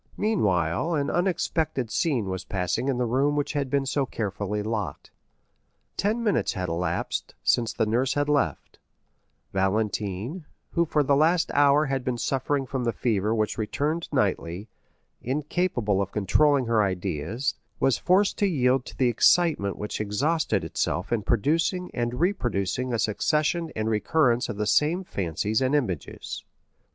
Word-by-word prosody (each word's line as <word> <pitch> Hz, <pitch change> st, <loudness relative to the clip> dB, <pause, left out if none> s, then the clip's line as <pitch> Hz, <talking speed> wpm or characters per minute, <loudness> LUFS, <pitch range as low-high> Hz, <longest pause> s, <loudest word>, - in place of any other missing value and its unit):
Meanwhile 105 Hz, -, +1 dB
an 140 Hz, -2 st, 0 dB
unexpected 160 Hz, -, 0 dB
scene 130 Hz, -8 st, +1 dB
was 95 Hz, -1 st, -4 dB
passing 90 Hz, +6 st, -2 dB
in 135 Hz, -3 st, +1 dB
the 125 Hz, -, +1 dB
room 135 Hz, +5 st, +1 dB
which 145 Hz, 0 st, -1 dB
had 140 Hz, -2 st, -1 dB
been 140 Hz, 0 st, +1 dB
so 135 Hz, +1 st, 0 dB
carefully 105 Hz, -1 st, -3 dB
locked. 110 Hz, -2 st, -4 dB, 0.8 s
Ten 220 Hz, +4 st, 0 dB
minutes 210 Hz, -3 st, +1 dB
had 90 Hz, -4 st, -3 dB
elapsed 85 Hz, +1 st, -2 dB
since 115 Hz, -2 st, +2 dB
the 110 Hz, -, 0 dB
nurse 125 Hz, +5 st, +1 dB
had 145 Hz, 0 st, +1 dB
left; 140 Hz, -, -1 dB, 0.7 s
Valentine, 105 Hz, -, -1 dB, 0.2 s
who 170 Hz, -, +2 dB
for 150 Hz, -1 st, +2 dB
the 140 Hz, 0 st, +3 dB
last 165 Hz, +4 st, +3 dB
hour 145 Hz, +1 st, +5 dB
had 135 Hz, -2 st, -2 dB
been 125 Hz, -1 st, -2 dB
suffering 135 Hz, +3 st, -1 dB
from 130 Hz, 0 st, -3 dB
the 120 Hz, -, +1 dB
fever 110 Hz, -2 st, 0 dB
which 110 Hz, 0 st, -1 dB
returned 150 Hz, +9 st, -1 dB
nightly, 100 Hz, -, -1 dB, 0.5 s
incapable 130 Hz, -, 0 dB
of 100 Hz, -1 st, -3 dB
controlling 135 Hz, +7 st, +3 dB
her 115 Hz, -2 st, +2 dB
ideas, 95 Hz, -, -1 dB, 0.3 s
was 135 Hz, -, +2 dB
forced 195 Hz, +3 st, +2 dB
to 205 Hz, -, +3 dB
yield 130 Hz, -6 st, +2 dB
to -, -, -10 dB
the 130 Hz, -, +3 dB
excitement 120 Hz, -, +3 dB
which 105 Hz, +1 st, -4 dB
exhausted 110 Hz, -, 0 dB
itself -, -, -2 dB
in 115 Hz, -, +1 dB
producing 165 Hz, -, 0 dB
and 120 Hz, 0 st, -2 dB
reproducing 125 Hz, -, 0 dB
a 120 Hz, -, 0 dB
succession 155 Hz, -, 0 dB
and 110 Hz, 0 st, -1 dB
recurrence 120 Hz, +3 st, +2 dB
of 100 Hz, -, -4 dB
the 105 Hz, -, -1 dB
same 155 Hz, -, +2 dB
fancies 100 Hz, -, -1 dB
and 130 Hz, +2 st, +2 dB
images. 95 Hz, -, -3 dB
125 Hz, 150 wpm, -26 LUFS, 105-150 Hz, 0.8 s, hour